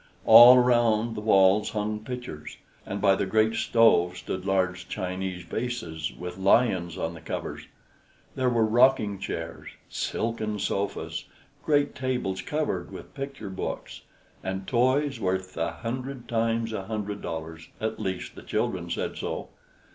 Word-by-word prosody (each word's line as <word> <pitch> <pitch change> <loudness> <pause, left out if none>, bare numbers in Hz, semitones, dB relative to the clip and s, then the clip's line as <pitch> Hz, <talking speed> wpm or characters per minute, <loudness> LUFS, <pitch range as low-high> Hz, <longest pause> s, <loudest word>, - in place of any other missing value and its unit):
All 125 +2 +10
around 120 -2 +3
the 105 - -5
walls 100 -1 +4
hung 105 0 -2
pictures, 125 -8 -7 0.3
and 100 - -3
by 100 -2 +5
the 95 - -1
great 110 +3 +3
stove 100 -7 +3
stood 95 0 -5
large 95 -1 0
Chinese 95 -2 -4
vases 85 -10 -4
with 90 +1 -8
lions 95 -4 +2
on 80 - -2
the 80 - -11
covers; 80 - -5 0.7
there 130 -1 +1
were 115 -2 +2
rocking 110 -3 +3
chairs, 85 -3 -5 0.2
silken 110 -2 -2
sofas, 100 0 -3 0.4
great 145 -1 +2
tables 125 -8 -2
covered 155 0 -2
with - - -10
picture 135 -8 -6
books, 95 - -5 0.4
and 95 0 -4
toys 135 +4 +1
worth 95 0 -2
a 80 - -1
hundred 120 +7 -5
times 115 0 0
a 95 -3 -4
hundred 105 -1 -4
dollars, 80 0 -6
at 110 0 -3
least 95 -1 -4
the - - -11
children - - -2
said - - -3
so. - - -4
105 Hz, 140 wpm, -27 LUFS, 95-120 Hz, 0.7 s, All